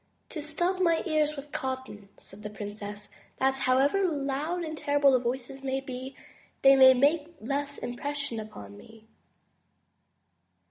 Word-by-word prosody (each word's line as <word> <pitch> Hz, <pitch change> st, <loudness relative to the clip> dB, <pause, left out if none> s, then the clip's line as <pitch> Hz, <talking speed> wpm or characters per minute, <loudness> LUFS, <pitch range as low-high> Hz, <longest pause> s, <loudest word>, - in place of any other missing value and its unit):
*'To 310 Hz, -, -5 dB
stop 345 Hz, +5 st, -1 dB
my 335 Hz, -2 st, +3 dB
ears 305 Hz, -3 st, +1 dB
with 285 Hz, 0 st, -9 dB
cotton," 260 Hz, -6 st, -5 dB
said 195 Hz, +2 st, -11 dB
the 210 Hz, -, -6 dB
princess, 205 Hz, 0 st, -7 dB, 0.3 s
that, 265 Hz, 0 st, +2 dB
however 270 Hz, +8 st, +2 dB
loud 300 Hz, +1 st, -1 dB
and 315 Hz, -1 st, -4 dB
terrible 285 Hz, -2 st, +3 dB
the 255 Hz, -, +4 dB
voices 255 Hz, +2 st, -4 dB
may 265 Hz, 0 st, -1 dB
be, 260 Hz, 0 st, -7 dB, 0.5 s
they 270 Hz, 0 st, +8 dB
may 260 Hz, -1 st, +8 dB
make 300 Hz, +5 st, +2 dB
less 280 Hz, +4 st, -3 dB
impression 280 Hz, -1 st, -3 dB
upon 105 Hz, -, -9 dB
me." 220 Hz, -, -15 dB
270 Hz, 140 wpm, -28 LUFS, 245-295 Hz, 0.5 s, they